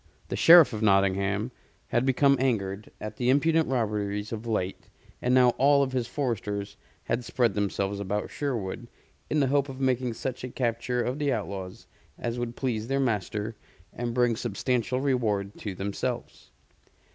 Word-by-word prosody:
The - - -2
Sheriff 165 -5 +8
of 110 - -4
Nottingham 100 +2 +2 0.4
had 120 +2 +1
become 140 +1 +4
angered 105 -6 -1
at 105 - -7
the 125 0 +1
impudent 160 +4 +3
robberies 105 -4 -1
of 115 +1 -5
late, 95 -4 -2 0.3
and 125 - +1
now 125 -1 +6
all 140 +1 +5
of 135 - -2
his 125 -3 -1
foresters 105 -7 -3 0.3
had 120 +2 -1
spread 120 0 +1
themselves 100 -1 -1
about 100 +1 -2
Sherwood 120 -5 -3 0.4
in 150 - +2
the - - +4
hope 140 -1 +2
of 130 0 -8
making 130 -2 +1
such 130 +1 -4
a 125 - -4
capture 120 0 -1
of 130 +4 -2
the 145 -2 +1
outlaws 100 -5 -4 0.3
as 120 0 -3
would 120 -1 -3
please 115 -4 -2
their 135 +1 0
master 110 -3 -1 0.4
and 120 0 -3
bring 120 -2 +3
substantial 125 +2 -1
reward 110 -8 0
to 100 -3 -5
themselves. 100 +2 -4
120 Hz, 160 wpm, -27 LUFS, 105-130 Hz, 0.4 s, Sheriff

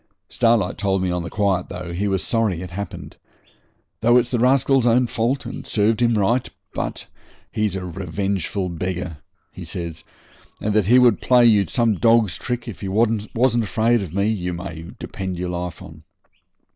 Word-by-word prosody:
Starlight 115 -6 +1
told 95 -2 +1
me 90 - 0
on 90 0 -1
the 85 - -6
quiet, 100 -3 0
though, 90 -1 -6
he 100 +4 -1
was 95 -2 0
sorry 110 -7 0
it 90 - -8
happened, 100 +3 -7 0.8
'though 120 +2 +4
it's 120 -1 +1
the 120 - 0
rascal's 130 0 +3
own 125 +2 +4
fault, 120 +4 -1
and - - -7
served 110 +2 +1
him 120 -1 +3
right. 115 +5 +1 0.2
But - - -4 0.5
he's 105 -3 -1
a 95 -1 -4
revengeful 95 +1 -3
beggar,' 90 -2 -4 0.3
he - - -9
says, 85 -2 -6 0.6
'and 105 - -1
that 105 -3 +2
he 125 +3 +6
would 125 -4 +5
play 125 -1 +5
you 105 -4 +5
some 115 -3 +2
dog's 110 -3 +3
trick 120 0 -4
if 115 - -8
he 100 - -4
wasn't 115 +3 +1
afraid 115 +2 +1
of 95 -5 -6
me, 100 +1 +2
you 90 -5 -2
may 85 -2 -7
depend 95 -2 -5
your 90 0 -3
life 90 -1 -5
on.' - - -12
100 Hz, 180 wpm, -22 LUFS, 90-115 Hz, 0.8 s, he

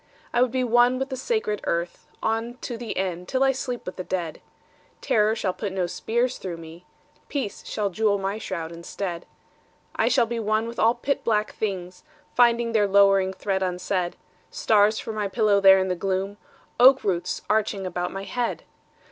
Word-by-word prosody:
I 240 - +3
would 250 - +4
be 255 +1 0
one 240 +1 +4
with 265 +1 -3
the 260 - -3
sacred 260 - -1
earth 170 +1 -2 0.2
On 225 +2 -1
to 240 - -4
the 230 -1 -5
end, 180 -2 -2
till 260 0 +1
I 270 - +4
sleep 250 -2 -4
with 180 - -7
the 185 - -4
dead. 175 -4 -4 0.6
Terror 215 0 +2
shall 190 -4 -1
put 205 0 -4
no 185 -2 0
spears 235 +7 -1
through 180 -3 -5
me. 165 +2 -12 0.4
Peace 265 -8 -4
shall 205 -2 -2
jewel 205 +1 +2
my 195 +2 -3
shroud 170 -6 -5
instead. 170 +1 -5 0.7
I 225 - +2
shall 245 0 +4
be 235 0 -3
one 215 +1 0
with 235 0 -7
all 230 +2 +4
pit 275 +4 -2
black 215 -2 0
things 185 -4 -4 0.3
Finding 235 -1 +3
their 210 -2 +3
lowering 195 -1 +4
threat 190 0 -2
unsaid: 180 -1 -1 0.3
Stars 215 0 +3
for 220 - -5
my 210 -1 -1
pillow 205 -1 +2
there 190 -1 +8
in 190 0 +1
the 180 - 0
gloom,— 195 +2 -2 0.4
Oak 265 +2 +7
roots 180 -3 -1
arching 210 -2 0
about 180 -1 -3
my 195 0 -5
head! 240 +3 -2
205 Hz, 185 wpm, -25 LUFS, 185-235 Hz, 0.7 s, there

